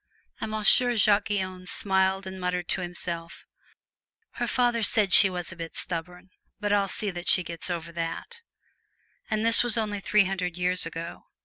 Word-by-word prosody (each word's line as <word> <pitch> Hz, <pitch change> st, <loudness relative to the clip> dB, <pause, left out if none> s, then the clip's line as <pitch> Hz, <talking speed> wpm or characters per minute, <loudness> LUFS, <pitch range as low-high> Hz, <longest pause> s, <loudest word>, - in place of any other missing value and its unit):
And -, -, -4 dB
Monsieur 215 Hz, +3 st, +3 dB
Jacques 205 Hz, -1 st, +3 dB
Guyon 185 Hz, -3 st, -3 dB
smiled 190 Hz, 0 st, 0 dB
and 190 Hz, 0 st, -7 dB
muttered 180 Hz, -1 st, -2 dB
to 190 Hz, -, -1 dB
himself, 170 Hz, -1 st, -5 dB, 0.9 s
"Her -, -, -3 dB
father 245 Hz, -2 st, +1 dB
said 205 Hz, -2 st, +2 dB
she 195 Hz, -, +9 dB
was 180 Hz, -1 st, -5 dB
a -, -, -9 dB
bit 165 Hz, -1 st, -8 dB
stubborn, 180 Hz, +2 st, -6 dB, 0.3 s
but 205 Hz, -1 st, 0 dB
I'll 200 Hz, -1 st, +2 dB
see 205 Hz, +1 st, -3 dB
that 175 Hz, -1 st, -8 dB
she 185 Hz, -, +5 dB
gets 170 Hz, +1 st, -7 dB
over 170 Hz, -1 st, -4 dB
it!" 170 Hz, -, -5 dB, 0.9 s
And 215 Hz, 0 st, 0 dB
this 230 Hz, +1 st, +6 dB
was 240 Hz, -1 st, +1 dB
over 210 Hz, -2 st, -2 dB
three 210 Hz, +1 st, +3 dB
hundred 180 Hz, -2 st, -3 dB
years 180 Hz, -1 st, -1 dB
ago. 165 Hz, +1 st, -8 dB
190 Hz, 175 wpm, -26 LUFS, 175-210 Hz, 0.9 s, she